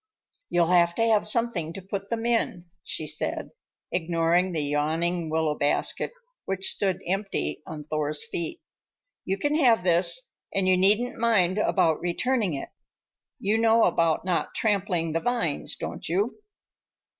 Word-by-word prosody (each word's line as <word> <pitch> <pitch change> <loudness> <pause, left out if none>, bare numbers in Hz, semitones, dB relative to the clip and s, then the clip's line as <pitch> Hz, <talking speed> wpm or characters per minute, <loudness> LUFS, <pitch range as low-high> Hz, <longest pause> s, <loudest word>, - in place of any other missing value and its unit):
"You'll 175 0 +2
have 170 -1 +4
to 230 - +1
have 215 -2 +3
something 215 -8 0
to 195 - -7
put 195 +1 -5
them 230 -1 -2
in," 230 -7 0 0.2
she 155 - -2
said, - - -4 0.4
ignoring 170 +1 +1
the 160 -3 -1
yawning 160 +4 0
willow 160 -1 +1
basket 145 -1 0 0.3
which 190 0 0
stood 190 -3 -1
empty 185 - -2
on 155 -2 -7
Thor's 150 0 -2
feet. 170 - -5 0.6
"You 190 +1 -1
can 290 +8 0
have 245 - +4
this, 185 - +2 0.2
and 195 -1 +2
you 185 - +5
needn't 210 +7 +2
mind 210 -5 +3
about 165 -6 +2
returning 200 - 0
it. 135 - -6 0.7
You 210 +3 +1
know 225 0 +4
about 165 -1 +2
not 180 -2 -1
trampling 190 -6 0
the 165 - 0
vines, 230 -9 -1
don't - - -6
you?" 205 - -1
180 Hz, 145 wpm, -26 LUFS, 165-215 Hz, 0.7 s, you